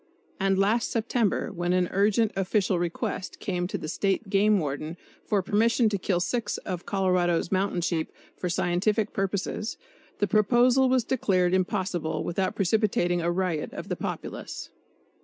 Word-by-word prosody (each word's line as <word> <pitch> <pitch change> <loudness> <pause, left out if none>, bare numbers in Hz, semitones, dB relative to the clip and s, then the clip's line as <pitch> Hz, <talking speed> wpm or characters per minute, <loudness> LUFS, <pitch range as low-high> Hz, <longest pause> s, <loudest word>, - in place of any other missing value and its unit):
And 195 -1 +2
last 210 +4 +2
September 230 -2 0
when 175 -1 -1
an 180 -1 +2
urgent 210 +2 +2
official 195 -1 +1
request 175 +2 -3
came 180 -3 -2
to - - -3
the - - -6
State 195 +4 -1
Game 205 +1 +4
Warden 155 0 -3 0.3
for 205 -3 +1
permission 225 +4 +3
to 205 - -1
kill 180 -1 0
six 205 +4 -1
of 180 -1 -6
Colorado's 180 -4 +1
mountain 190 -2 +1
sheep 165 -2 -1 0.2
"for 180 - -3
scientific 185 +5 0
purposes," 195 +3 -2 0.4
the 205 - +2
proposal 240 +6 +4
was 255 -1 +3
declared 185 -8 +1
impossible 180 -4 -1
without 185 +2 -1
precipitating 185 -3 +1
a 170 - 0
riot 175 -4 -1
of - - -7
the - - -1
populace. - - -6
195 Hz, 150 wpm, -27 LUFS, 175-210 Hz, 0.4 s, Game